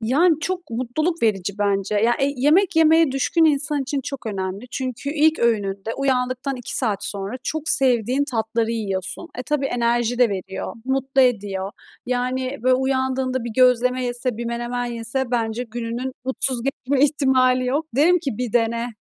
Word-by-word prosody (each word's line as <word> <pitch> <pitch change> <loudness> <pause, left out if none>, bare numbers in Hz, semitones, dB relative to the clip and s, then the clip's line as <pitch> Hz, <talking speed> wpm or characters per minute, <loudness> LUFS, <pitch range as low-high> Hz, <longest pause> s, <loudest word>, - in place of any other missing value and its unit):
Yani 300 +8 +3
çok 355 -2 -4
mutluluk 265 +8 -2
verici 200 -3 +1
bence. 200 0 0
Ya 230 +3 +3
e 275 - +3
yemek 320 +7 +3
yemeye 320 -2 +5
düşkün 320 +5 +2
insan 290 -1 +2
için 275 +1 -2
çok 270 -2 -7
önemli. 195 0 -4
Çünkü 260 +2 -4
ilk 315 +1 +3
öğününde 210 -2 0
uyandıktan 260 0 -1
2 245 - -3
saat 205 -5 0
sonra 200 +4 -4
çok 315 +3 -3
sevdiğin 255 +1 +2
tatları 225 0 -1
yiyorsun. 200 - -3
E, - - -2
tabii, 280 +1 -1
enerji 240 -1 0
de 245 - +5
veriyor, 190 -1 -5
mutlu 265 0 +1
ediyor. 200 -5 0 0.4
Yani, 255 +2 -2
böyle, 255 0 +4
uyandığında 260 -1 0
bir 235 - -4
gözleme 250 0 +3
yese, 245 -1 -2
bir 235 - -4
menemen 240 +1 -3
yese 240 +2 -3
bence 230 0 -1
gününün 240 +2 -4
mutsuz 260 -1 0
geçme 275 +1 +1
ihtimali 260 -3 +2
yok. 290 +5 0
Derim 350 +5 +5
ki 275 - -3
bir 245 -3 -3
dene, 235 0 +1
250 Hz, 160 wpm, -22 LUFS, 230-275 Hz, 0.4 s, yemeye